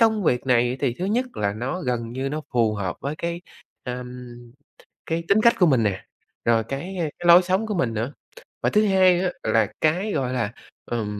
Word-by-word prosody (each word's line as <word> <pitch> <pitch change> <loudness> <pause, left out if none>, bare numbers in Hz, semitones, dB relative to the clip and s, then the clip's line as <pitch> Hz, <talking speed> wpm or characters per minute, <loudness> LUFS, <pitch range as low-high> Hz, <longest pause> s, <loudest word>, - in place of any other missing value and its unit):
công 220 -2 +3
việc 125 -2 +1
này 125 0 +2
thì 130 -4 0
thứ 180 - -2
nhất 240 +6 0
là 100 -1 0
nó 130 +11 -3
gần 115 -2 -2
như 135 +2 -2
nó 155 +2 -3
phù 110 -3 +2
hợp 95 -3 -3
với 140 +2 -3
cái, 170 0 -3 0.4
ờm, 125 0 -6 0.8
cái 165 +1 -2
tính 210 +2 +4
cách 235 - +6
của 180 - +6
mình 130 -6 +3
nè, 100 -3 -2 0.4
rồi 115 -1 +3
cái, 145 - -5
ơ, - - -1 0.2
cái 175 - -7
lối 170 +2 +9
sống 190 +5 0
của 210 - -2
mình 125 -10 0
nữa. 115 +6 -3 0.5
Và - - +2
thứ 215 0 +3
hai 185 -2 +4
nữa 185 0 0
là 110 -1 +2
cái, 180 +7 +1
gọi 130 -3 -1
là, 115 -5 -1 0.3
ừm, 105 -3 -3
135 Hz, 215 wpm, -23 LUFS, 115-180 Hz, 0.8 s, lối